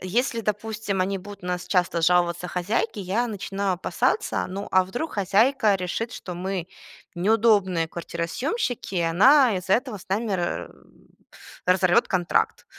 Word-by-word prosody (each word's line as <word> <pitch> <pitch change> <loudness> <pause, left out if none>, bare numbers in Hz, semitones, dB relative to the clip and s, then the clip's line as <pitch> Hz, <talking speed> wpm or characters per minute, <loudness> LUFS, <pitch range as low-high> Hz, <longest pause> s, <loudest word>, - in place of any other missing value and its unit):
Если, 230 +5 -1
допустим, 210 -1 -2
они 195 +1 0
будут 200 +1 -11
на 180 - -6
нас 180 0 -3
часто 175 -3 +1
жаловаться 175 0 +2
хозяйке, 190 +4 -2
я 200 +6 0
начинаю 200 -2 -2
опасаться, 180 - -1
ну 195 +2 -5
а 185 0 +4
вдруг 245 - -5
хозяйка 210 +3 +3
решит, 195 +5 -3
что 180 - -7
мы 185 0 -4 0.5
неудобные 200 -4 +2
квартиросъёмщики, 200 - -3
и - - +2
она 220 - +5
из-за 185 +1 -2
этого 245 -3 -2
с 185 - -16
нами 210 +3 -1
ра 175 -2 -2 1.0
разорвет 180 -1 +4
контракт. 175 -2 0
195 Hz, 140 wpm, -24 LUFS, 180-220 Hz, 1.0 s, она